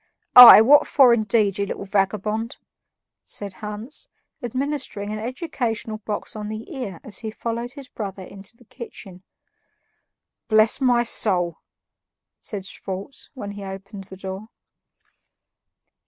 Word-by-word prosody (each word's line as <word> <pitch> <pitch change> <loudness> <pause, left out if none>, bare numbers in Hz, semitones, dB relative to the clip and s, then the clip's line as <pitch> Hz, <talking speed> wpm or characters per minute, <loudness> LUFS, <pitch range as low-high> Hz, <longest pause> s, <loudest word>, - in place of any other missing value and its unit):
"Aye! 245 -3 +12
what 290 +5 +6
for, 260 -4 +5
indeed, 210 -3 +1
you 200 - -1
little 200 - -6
vagabond?" 210 +3 -1 0.7
said 200 -2 -7
Hans, 210 +6 -7 0.3
administering 255 -4 -4
an 215 - -4
educational 230 -4 -4
box 210 0 -5
on 210 -1 -5
the 220 +8 -7
ear 210 -10 -6
as 210 - -5
he 220 - -5
followed 235 +2 -5
his 280 -3 -11
brother 195 -5 -7
into 195 +4 -10
the 245 - -21
kitchen. 220 -7 -11 1.3
"Bless 215 +3 +3
my 245 -2 +3
soul!" 180 -7 0 0.8
said 200 -3 -5
Schwartz 195 +6 -7
when 205 -6 -6
he 205 0 -9
opened 195 +1 -9
the 190 0 -12
door. 190 +2 -7
215 Hz, 125 wpm, -22 LUFS, 195-240 Hz, 1.3 s, Aye